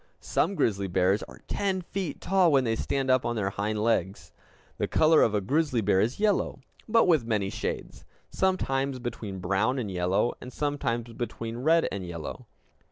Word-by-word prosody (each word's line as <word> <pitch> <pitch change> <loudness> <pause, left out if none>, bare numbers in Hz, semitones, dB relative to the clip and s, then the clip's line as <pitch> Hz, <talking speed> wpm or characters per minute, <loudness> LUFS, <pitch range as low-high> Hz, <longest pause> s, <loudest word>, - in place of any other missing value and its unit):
Some 200 - 0
grizzly 100 - +1
bears 95 +3 +2
are - - -11
ten 195 -2 -1
feet 180 -3 -4
tall 185 -3 +3
when 135 -2 +4
they 115 -2 0
stand 135 +3 -1
up 130 -1 +3
on 120 - -1
their 100 -3 -1
hind 105 +2 -2
legs! 100 -4 -1 0.5
The - - 0
color 155 0 +4
of 110 - +3
a 105 - +1
grizzly 140 +3 +1
bear 95 -2 +3
is 120 - -1
yellow, 210 -2 +1 0.3
but 230 +1 +5
with 160 -8 +4
many 105 -4 -1
shades; - - -5 0.3
sometimes 135 -8 0
between 115 -5 -5
brown 100 +8 0
and 110 -6 -3
yellow, 90 +6 +1
and 125 - -8
sometimes 120 -5 -2
between 115 0 -5
red 160 +6 +3
and 95 -1 -4
yellow. 85 -3 -7
120 Hz, 175 wpm, -27 LUFS, 100-145 Hz, 0.5 s, but